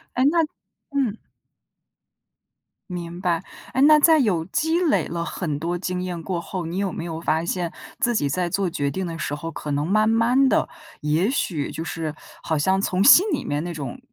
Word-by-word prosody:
诶， 255 - +2
那 340 - +1 0.5
嗯。 255 -7 0 1.7
明 175 0 -6
白。 175 -3 0 0.3
诶， 260 - 0
那 305 +1 +8
在 320 +1 +6
有 185 - +1
积 320 - 0
累 325 -5 +2
了 170 0 -3
很 155 -6 -3
多 175 +3 -2
经 180 0 -3
验 175 -2 -4
过 175 0 -2
后， 180 -1 -5
你 170 +3 -5
有 195 -2 -1
没 165 - -5
有 165 -1 -5
发 160 0 0
现 175 0 -2 0.3
自 240 0 +1
己 145 -9 +1
在 175 +5 -1
做 195 0 0
决 145 -4 -1
定 190 +2 -3
的 165 -1 -5
时 145 - -2
候， 165 +3 -5
可 150 -1 -6
能 145 +2 0
慢 215 +2 +3
慢 240 +4 +4
地， - - +2 0.3
也 155 - +1
许 165 - -1
就 160 - -5
是 160 -2 -4 0.3
好 160 -2 -1
像 190 +5 +2
从 185 -1 0
心 315 - +8
里 290 - -1
面 145 +1 -1
那 175 - -4
种 155 - -6
180 Hz, 210 characters per minute, -23 LUFS, 165-225 Hz, 1.7 s, 那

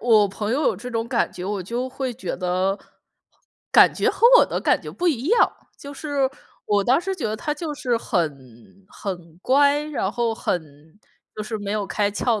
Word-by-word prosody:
我 215 -4 +4
朋 210 +2 -3
友 285 +5 +1
有 - - +2
这 250 +3 -7
种 230 0 -2
感 - - 0
觉， 180 - -7
我 195 -1 -2
就 240 +7 -3
会 260 -1 -4
觉 245 - -5
得， 185 +2 0 0.9
感 - - +7
觉 - - +1
和 470 - +4
我 - - +6
的 - - -3
感 - - +2
觉 - - -8
不 355 0 0
一 275 -3 -1
样。 470 +2 +4 0.3
就 285 0 -9
是， 280 -2 -1 0.4
我 205 -1 +2
当 260 +5 +4
时 385 +2 -3
觉 335 - -5
得 215 0 -1
他 300 +7 -2
就 305 -1 -5
是 255 -5 0
很 150 - -4
很 175 -6 -7
乖， 285 +7 +3
然 285 -10 -2
后 235 -2 0
很 175 -6 -1 0.7
就 215 - -4
是 220 +1 -4
没 205 0 -4
有 210 -2 -1
开 205 0 0
窍 215 +1 0
225 Hz, 220 characters per minute, -23 LUFS, 195-275 Hz, 0.9 s, 感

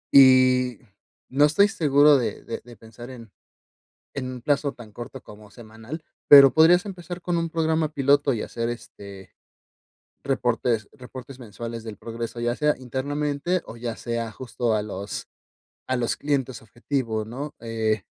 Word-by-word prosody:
Y, 130 -2 +6 0.5
no 145 +3 +4
estoy 155 +7 +4
seguro 145 -6 +5
de 120 - -4
de 115 - -6
de 120 -1 -14
pensar 115 +3 -12
en 115 -5 -11 0.8
en 130 -2 -4
un 125 -1 -7
plazo 145 +2 0
tan 120 -4 -13
corto 120 +2 -9
como 105 0 -14
semanal, 115 +8 -10 0.2
pero 140 -3 +9
podrías 175 +4 +5
empezar 180 -2 -7
con 175 0 -2
un 165 0 -2
programa 160 -1 0
piloto 140 0 +3
y 115 - -2
hacer, 115 0 -4
este, 100 -4 -9 0.9
reportes 120 -4 0
reportes 130 +1 -11
mensuales 115 0 -7
del 110 -3 -8
progreso. 115 0 -6
Ya 120 +1 -1
sea 150 -1 +2
internamente 145 +6 -2
o 115 - -9
ya 115 -1 -5
sea 115 -1 -4
justo 120 -1 -2
a 105 - +1
los 100 -1 -6 0.6
a 130 - 0
los 120 -2 -1
clientes 135 -5 -2
objetivo, 115 0 -3
¿no? 135 +7 -7
eh 110 -2 -1
125 Hz, 150 wpm, -24 LUFS, 115-145 Hz, 0.9 s, pero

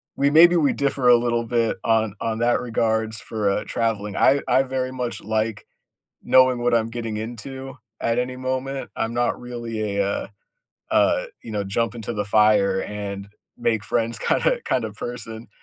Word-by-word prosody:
we 140 +1 +2
maybe 170 +3 +7
we 150 -4 +3
differ 140 -2 0
a 120 - +9
little 120 0 0
bit 115 -1 0
on 110 -2 +2
on 110 0 -2
that 120 +1 +2
regards 110 -2 -1
for, 105 -3 -1
uh, 100 - 0
traveling. 105 -3 -2
I 140 +1 +4
I 130 - +4
very 130 -1 -3
much 125 -2 -4
like 110 0 -2 0.6
knowing 130 -1 +5
what 120 0 +2
I'm 115 -1 +1
getting 115 -2 -4
into 130 +5 -7 0.2
at 115 +1 +1
any 125 +1 -2
moment, 130 +1 -3
I'm 115 +1 -1
not 120 0 0
really 115 -4 -4
a, 100 - +3
uh 100 - -2 0.6
uh, - - +3 0.2
you - - -9
know, 105 -1 -1
jump 115 +4 -1
into 115 0 -5
the 105 -2 -1
fire 105 -2 +3
and 100 -1 -5 0.3
make 115 -3 0
friends 115 +2 -1
kinda - - +1
kinda 115 -4 -1
person, 115 0 -7
115 Hz, 175 wpm, -23 LUFS, 110-125 Hz, 0.6 s, a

